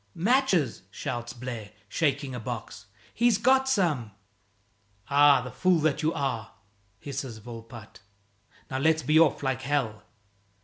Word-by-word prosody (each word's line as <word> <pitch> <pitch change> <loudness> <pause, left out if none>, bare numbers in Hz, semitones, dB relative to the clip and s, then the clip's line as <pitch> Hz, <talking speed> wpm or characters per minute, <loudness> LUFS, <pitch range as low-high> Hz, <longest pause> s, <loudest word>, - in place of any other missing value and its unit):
"Matches!" 190 - +2
shouts 120 -4 -5
Blaire, 120 -3 -7 0.2
shaking 140 -3 -1
a 125 - -4
box, 110 -3 -7 0.3
"he's 235 -2 +3
got 265 +3 +3
some!" 165 - +1 1.0
"Ah, 145 -1 +6
the 125 - -7
fool 185 -2 +2
that 155 -2 +1
you 155 +1 +1
are!" 130 -6 -3 0.4
hisses 135 -2 -6
Volpatte. 115 0 -11 0.7
"Now 130 - -1
let's 160 +2 +2
be 155 +4 +4
off 160 -3 +3
like 130 -1 -1
hell." 130 -6 -1
135 Hz, 130 wpm, -27 LUFS, 120-160 Hz, 1.0 s, Ah